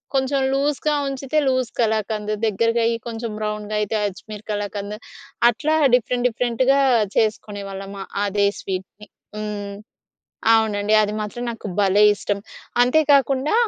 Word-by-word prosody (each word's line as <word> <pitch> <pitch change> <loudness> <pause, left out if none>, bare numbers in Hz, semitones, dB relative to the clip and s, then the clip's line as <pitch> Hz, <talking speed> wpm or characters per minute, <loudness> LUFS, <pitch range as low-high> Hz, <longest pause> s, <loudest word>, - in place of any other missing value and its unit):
కొంచెం 270 +1 +1
లూస్‌గా 295 +2 +1
ఉంచితే 275 +2 -3
లూస్ 255 -2 +1
కళాకంద్ 215 -1 0
దగ్గరగై 230 +2 +2 0.2
కొంచెం 230 -1 -4
బ్రౌన్‌గైతే 210 0 -2
అజ్మీర్ 210 +2 -9
కళాకంద్. 205 0 -4 0.5
అట్లా 300 +7 0 0.2
డిఫరెంట్ 250 +1 +1
డిఫరెంట్‌గా 250 +4 +1 0.4
చేసుకునేవాళ్ళం 200 -2 -2 0.3
అదే 200 0 +2
స్వీట్‌ని. 190 +2 -6 0.3
హ్మ్. 205 -1 -5 0.8
అవునండి. 215 -1 +2
అది 210 0 -1
మాత్రం 210 +3 -5
నాకు 225 -2 -7
భలే 200 +1 +4
ఇష్టం. 200 0 -2 0.4
అంతే 250 +6 +4
కాకుండా 275 +4 +3
215 Hz, 110 wpm, -22 LUFS, 205-250 Hz, 0.8 s, భలే